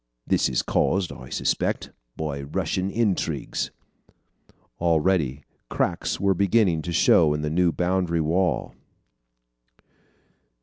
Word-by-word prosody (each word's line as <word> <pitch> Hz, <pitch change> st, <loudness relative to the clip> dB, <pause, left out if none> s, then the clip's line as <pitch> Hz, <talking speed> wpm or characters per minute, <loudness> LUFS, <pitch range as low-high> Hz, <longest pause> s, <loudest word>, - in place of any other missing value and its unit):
This -, -, +2 dB
is 65 Hz, -, 0 dB
caused, 95 Hz, -2 st, +1 dB
I 65 Hz, -, -10 dB
suspect, -, -, -1 dB, 0.3 s
by 75 Hz, -3 st, -3 dB
Russian 90 Hz, +5 st, -2 dB
intrigues." 105 Hz, -3 st, -1 dB, 1.1 s
Already 80 Hz, -4 st, +1 dB, 0.3 s
cracks -, -, -1 dB
were 100 Hz, -1 st, +3 dB
beginning 100 Hz, -3 st, +2 dB
to 85 Hz, -, -5 dB
show 80 Hz, -2 st, +4 dB
in 75 Hz, -, -3 dB
the 75 Hz, -, -2 dB
new 90 Hz, +1 st, +3 dB
boundary 90 Hz, -1 st, 0 dB
wall. 85 Hz, +4 st, 0 dB
85 Hz, 105 wpm, -24 LUFS, 75-95 Hz, 1.1 s, show